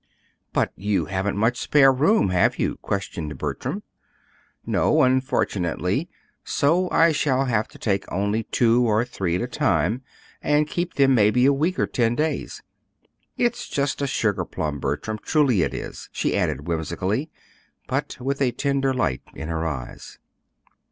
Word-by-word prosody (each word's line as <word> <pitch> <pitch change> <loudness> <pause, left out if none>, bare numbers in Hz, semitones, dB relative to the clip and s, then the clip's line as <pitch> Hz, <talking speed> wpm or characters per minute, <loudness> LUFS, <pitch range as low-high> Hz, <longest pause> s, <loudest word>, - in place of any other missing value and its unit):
"But - - +1
you 100 +1 0
haven't 95 +1 -2
much 115 +4 +1
spare 140 -2 +5
room; 150 - +3
have 90 -1 +2
you?" - - -1
questioned 85 -6 -4
Bertram. - - -4 0.8
"No, 155 -1 +3
unfortunately; 130 - 0 0.3
so 175 +6 +1
I 165 0 +4
shall 135 -3 +1
have 110 -4 0
to - - -16
take 100 -3 -2
only 100 +4 0
two 120 0 +3
or 110 0 +2
three 95 -8 -2
at 90 - -1
a - - -2
time, 115 - +1 0.4
and 150 0 +2
keep 175 +2 -3
them 135 -1 +4
maybe 115 +2 +4
a 140 - +5
week 165 +7 0
or - - +2
ten 120 -1 0
days. 155 +3 -2 0.7
It's 240 -1 0
just 140 0 -1
a 140 - 0
sugar 105 -8 0
plum, 75 -3 -4
Bertram. 110 +9 -3
Truly 135 - +2
it - - 0
is," - - -7
she - - -1
added 70 +5 -1
whimsically, 90 - -2 0.6
but 135 +3 -2
with 135 +2 -2
a 130 - +4
tender 135 -2 0
light 70 - 0
in 80 - -6
her 80 0 -1
eyes. 65 -6 -7
120 Hz, 155 wpm, -23 LUFS, 95-140 Hz, 0.8 s, spare